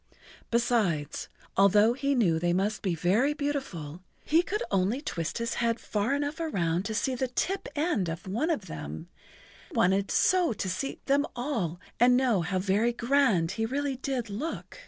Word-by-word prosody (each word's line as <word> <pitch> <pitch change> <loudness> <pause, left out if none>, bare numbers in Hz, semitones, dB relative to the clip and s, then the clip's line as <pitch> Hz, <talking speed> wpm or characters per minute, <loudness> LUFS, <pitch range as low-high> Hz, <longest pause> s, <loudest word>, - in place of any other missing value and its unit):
Besides, 225 -11 0 0.3
although 205 +4 +5
he 275 +2 0
knew 175 -10 +3
they 175 +1 +1
must 200 +4 0
be 185 -4 0
very 210 - +2
beautiful, 235 - -4 0.2
he 320 +3 +4
could 420 +5 -2
only 195 +6 +1
twist 170 - -3
his 230 0 -2
head 230 0 +1
far 215 +6 -1
enough 290 +3 -2
around 180 - 0
to 220 - -3
see 265 +4 0
the 255 +1 -1
tip 380 +10 -2
end 290 - 0
of 165 +5 -6
one 235 - -1
of 265 - -1
them, 75 - -6
and 80 - -9 0.6
he - - -12
wanted 195 +2 +2
so 360 -8 +3
to 200 - -4
see 275 +8 -3
them 285 +2 +2
all 230 - -2 0.2
and 245 +1 +6
know 245 -8 +2
how 185 +3 -1
very 205 +5 +1
grand 235 -9 +2
he 225 +3 -1
really 275 +2 -1
did 255 -3 -2
look. 300 - -5
230 Hz, 180 wpm, -28 LUFS, 185-275 Hz, 0.6 s, and